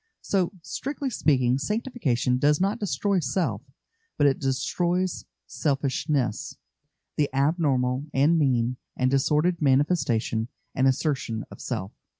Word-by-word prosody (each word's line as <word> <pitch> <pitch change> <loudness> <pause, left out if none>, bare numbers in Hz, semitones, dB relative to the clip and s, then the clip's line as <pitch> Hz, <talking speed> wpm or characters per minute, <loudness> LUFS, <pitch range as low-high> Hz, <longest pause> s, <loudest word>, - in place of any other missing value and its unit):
So, 190 -3 +1
strictly 275 - -4
speaking, 130 - +2
sanctification 150 - 0
does 145 +2 +3
not 195 +3 0
destroy 200 +2 0
self, 135 - -1 0.6
but - - +3
it 140 -2 +3
destroys 170 +7 -1 0.2
selfishness 135 -3 -1 0.6
the 145 -2 +2
abnormal 135 -2 +1
and 150 +4 +3
mean 125 -3 +1 0.2
and 130 0 +2
disordered 150 +5 +2
manifestation 135 -6 +1 0.3
and 130 0 +2
assertion 130 -5 -1
of - - -11
self. 95 +2 -4
140 Hz, 115 wpm, -26 LUFS, 130-170 Hz, 0.6 s, does